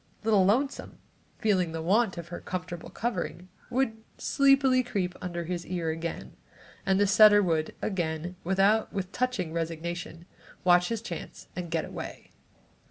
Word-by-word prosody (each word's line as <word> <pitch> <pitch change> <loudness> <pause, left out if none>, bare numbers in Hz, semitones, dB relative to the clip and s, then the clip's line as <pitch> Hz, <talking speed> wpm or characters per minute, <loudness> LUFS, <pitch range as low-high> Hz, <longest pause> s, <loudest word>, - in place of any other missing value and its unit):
Little 210 -3 +4
Lonesome, 260 +8 0 0.4
feeling 185 -7 +1
the 165 - -3
want 200 +2 +2
of 170 0 -7
her 175 - -6
comfortable 180 -2 -5
covering, 185 -5 -3 0.2
would 240 -3 -1
sleepily 275 -2 +4
creep 195 -7 -2
under 175 -1 -3
his 175 +1 -3
ear 170 -3 -2
again 165 +1 -5 0.5
and 190 0 +3
the 205 - +5
setter 205 +1 +7
would 160 -3 0
again, 175 -2 -2
with 190 +2 -1 0.5
touching 230 -11 -1
resignation, 170 +1 -4 0.4
watch 180 -1 +5
his 230 -1 -3
chance 175 -7 -7
and 175 -1 -4
get 160 -1 -1
away. - - -8
180 Hz, 140 wpm, -28 LUFS, 170-215 Hz, 0.5 s, setter